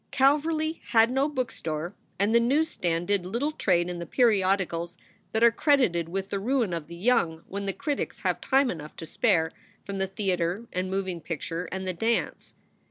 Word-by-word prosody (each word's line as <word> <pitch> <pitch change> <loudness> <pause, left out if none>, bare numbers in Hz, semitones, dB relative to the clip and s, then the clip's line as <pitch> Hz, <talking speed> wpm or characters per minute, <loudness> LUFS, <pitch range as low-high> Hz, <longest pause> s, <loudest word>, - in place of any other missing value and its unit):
Calverly 310 +4 +2
had 230 0 +4
no 270 +3 +2
bookstore 175 - -3 0.2
and 200 +3 +2
the 235 - +6
news 285 +7 +2
stands 170 -1 -1
did 200 -2 +1
little 235 +11 -1
trade 180 - +1
in 175 -1 -4
the 170 - -6
periodicals 190 -7 +1 0.3
that 220 +1 +1
are 235 - +8
credited 235 - +2
with 195 +2 -4
the 200 - -1
ruin 230 -3 0
of 165 -3 -4
the 170 - -9
young 170 -5 +1
when 200 +1 -4
the - - +1
critics 290 - -3
have - - 0
time 270 -1 +3
enough 155 -2 -8
to 165 - -7
spare 165 -4 +2 0.3
from 200 -1 -4
the 190 - 0
theater 190 +1 -1
and 185 +1 -1
moving 190 -3 -2
picture 165 +2 -4
and 190 0 -4
the 185 - -1
dance. 225 +6 -1
195 Hz, 185 wpm, -27 LUFS, 175-245 Hz, 0.3 s, are